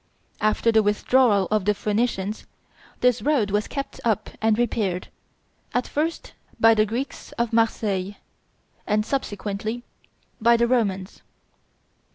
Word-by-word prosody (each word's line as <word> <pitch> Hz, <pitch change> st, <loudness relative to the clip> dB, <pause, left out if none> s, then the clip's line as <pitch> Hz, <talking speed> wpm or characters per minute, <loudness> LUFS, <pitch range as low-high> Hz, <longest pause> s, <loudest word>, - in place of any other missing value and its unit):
After 215 Hz, +2 st, +2 dB
the 220 Hz, -1 st, +5 dB
withdrawal 210 Hz, -1 st, +3 dB
of 215 Hz, -3 st, +1 dB
the 210 Hz, 0 st, +2 dB
Phoenicians 210 Hz, -1 st, -1 dB, 0.5 s
this 250 Hz, -1 st, +3 dB
road 265 Hz, -9 st, +1 dB
was 210 Hz, +1 st, 0 dB
kept 275 Hz, -1 st, -5 dB
up 220 Hz, -2 st, 0 dB
and 220 Hz, -1 st, +3 dB
repaired, 210 Hz, -6 st, -1 dB, 0.7 s
at 245 Hz, -, +1 dB
first 320 Hz, +3 st, -2 dB, 0.3 s
by 225 Hz, 0 st, +7 dB
the 215 Hz, -1 st, +2 dB
Greeks 245 Hz, +6 st, -5 dB
of 235 Hz, -1 st, -2 dB
Marseilles, 205 Hz, -4 st, 0 dB, 0.7 s
and 215 Hz, 0 st, +1 dB
subsequently 215 Hz, -2 st, -3 dB, 0.6 s
by 235 Hz, +1 st, +5 dB
the 235 Hz, -, +3 dB
Romans. 205 Hz, -6 st, -1 dB
220 Hz, 125 wpm, -24 LUFS, 205-240 Hz, 0.7 s, by